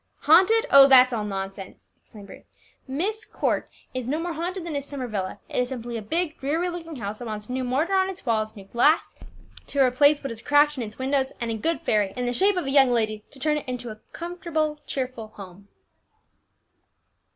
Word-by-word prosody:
"Haunted! 380 Hz, +9 st, +5 dB
Oh, 275 Hz, 0 st, +9 dB
that's 255 Hz, -2 st, +7 dB
all 220 Hz, -2 st, -1 dB
nonsense!" 195 Hz, -1 st, -7 dB
exclaimed 210 Hz, -3 st, -14 dB
Bruce. 200 Hz, -, -14 dB, 0.4 s
"Myst 385 Hz, +12 st, -3 dB
Court -, -, -1 dB, 0.2 s
is 255 Hz, -2 st, -4 dB
no 290 Hz, +4 st, 0 dB
more 340 Hz, +1 st, -3 dB
haunted 345 Hz, +3 st, -4 dB
than 325 Hz, -3 st, -4 dB
is 280 Hz, -, -2 dB
Summer 280 Hz, -2 st, -5 dB
Villa; 200 Hz, -5 st, -4 dB
it -, -, -3 dB
is 250 Hz, 0 st, 0 dB
simply 240 Hz, -2 st, -6 dB
a 225 Hz, -, -3 dB
big, 315 Hz, +8 st, -2 dB
dreary 320 Hz, +6 st, -1 dB
looking 330 Hz, -2 st, -7 dB
house 210 Hz, -3 st, -5 dB
that 245 Hz, -, -7 dB
wants 215 Hz, +1 st, -6 dB
new 260 Hz, 0 st, -2 dB
mortar 275 Hz, +9 st, 0 dB
on 380 Hz, 0 st, +3 dB
its 380 Hz, -, -8 dB
walls, 220 Hz, -2 st, 0 dB
new 200 Hz, -2 st, -11 dB
glass 245 Hz, +10 st, +2 dB, 0.5 s
to 285 Hz, -, -3 dB
replace 285 Hz, +3 st, +4 dB
what 275 Hz, -, -4 dB
is 230 Hz, -1 st, -7 dB
cracked 290 Hz, +2 st, +4 dB
in 260 Hz, -, -4 dB
its 215 Hz, -2 st, -6 dB
windows, 265 Hz, 0 st, 0 dB
and 235 Hz, -2 st, -2 dB
a -, -, -2 dB
good 325 Hz, +9 st, -1 dB
fairy, 205 Hz, -3 st, +1 dB
in 250 Hz, -, -2 dB
the 245 Hz, -, -1 dB
shape 390 Hz, +7 st, +2 dB
of 360 Hz, -, -1 dB
a 270 Hz, -, -2 dB
young 270 Hz, -2 st, +6 dB
lady, 215 Hz, -3 st, 0 dB
to -, -, -15 dB
turn 300 Hz, +2 st, +1 dB
it 295 Hz, -, -7 dB
into 245 Hz, -2 st, -5 dB
a 215 Hz, -, -11 dB
cheerful, 335 Hz, -3 st, -3 dB
comfortable 255 Hz, -4 st, -4 dB
home." 195 Hz, 0 st, -12 dB
265 Hz, 210 wpm, -25 LUFS, 225-315 Hz, 0.5 s, Oh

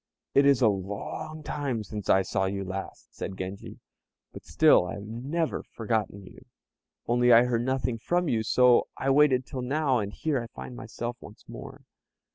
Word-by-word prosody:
"It 140 Hz, 0 st, +5 dB
is 135 Hz, -3 st, +4 dB
a -, -, +7 dB
long 100 Hz, +10 st, -4 dB
time 140 Hz, -7 st, -3 dB
since 105 Hz, 0 st, -7 dB
I 95 Hz, -, +5 dB
saw 95 Hz, 0 st, -1 dB
you 100 Hz, +1 st, -2 dB
last," 95 Hz, +1 st, -7 dB
said 95 Hz, -, -6 dB
Genji, 95 Hz, +2 st, -7 dB, 0.6 s
"but -, -, -10 dB
still 90 Hz, -, +4 dB
I -, -, -5 dB
have 100 Hz, -, -8 dB
never 135 Hz, +9 st, -2 dB
forgotten 105 Hz, -3 st, -3 dB
you, -, -, -14 dB, 0.6 s
only 120 Hz, +1 st, +3 dB
I 115 Hz, 0 st, +8 dB
heard 120 Hz, -1 st, 0 dB
nothing 130 Hz, -2 st, -1 dB
from 175 Hz, +8 st, 0 dB
you; 115 Hz, -6 st, +1 dB
so 125 Hz, +2 st, +4 dB
I 135 Hz, -, 0 dB
waited 135 Hz, -3 st, +4 dB
till 130 Hz, -, -6 dB
now, 135 Hz, 0 st, +1 dB
and 100 Hz, -1 st, -3 dB
here 145 Hz, +2 st, -1 dB
I 115 Hz, -, -7 dB
find 125 Hz, -, -9 dB
myself 120 Hz, +1 st, -6 dB
once 105 Hz, -, -14 dB
more." -, -, -10 dB
120 Hz, 180 wpm, -27 LUFS, 100-135 Hz, 0.6 s, I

